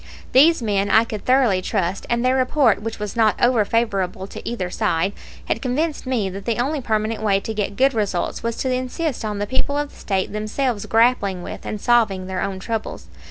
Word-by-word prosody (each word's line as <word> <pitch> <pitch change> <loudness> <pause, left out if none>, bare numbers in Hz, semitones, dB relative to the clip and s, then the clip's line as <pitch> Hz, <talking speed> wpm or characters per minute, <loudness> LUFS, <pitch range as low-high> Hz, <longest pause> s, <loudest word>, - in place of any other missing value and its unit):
These 295 +1 +5
men 200 -2 0
I 220 +3 +6
could 215 -3 -6
thoroughly 250 -8 +3
trust, 190 -1 -2
and 235 +1 +1
their 255 +1 +3
report, 260 -4 +3
which 225 +1 -4
was 210 0 -5
not 220 -2 +3
over 240 -3 +4
favorable 195 -4 -1
to - - -7
either 185 -7 -3
side, 180 +4 0 0.3
had - - -1
convinced 285 +3 -1
me 240 -6 0
that 195 +1 -8
the 230 -2 0
only 275 +4 -1
permanent 220 -1 -1
way 200 -2 +2
to 220 - -4
get 205 -2 -2
good 270 +1 +4
results 205 -5 -1
was 230 0 -2
to 260 -1 -1
insist 255 +3 -2
on 210 -1 -3
the 205 - -1
people 260 +5 -1
of 290 0 -2
the - - -19
State 190 -1 -1
themselves 215 +1 -2
grappling 225 -6 +2
with - - -7
and 215 - -4
solving 220 -5 +2
their 185 0 -3
own 195 -1 -2
troubles. 220 +3 -5
220 Hz, 205 wpm, -21 LUFS, 200-255 Hz, 0.3 s, I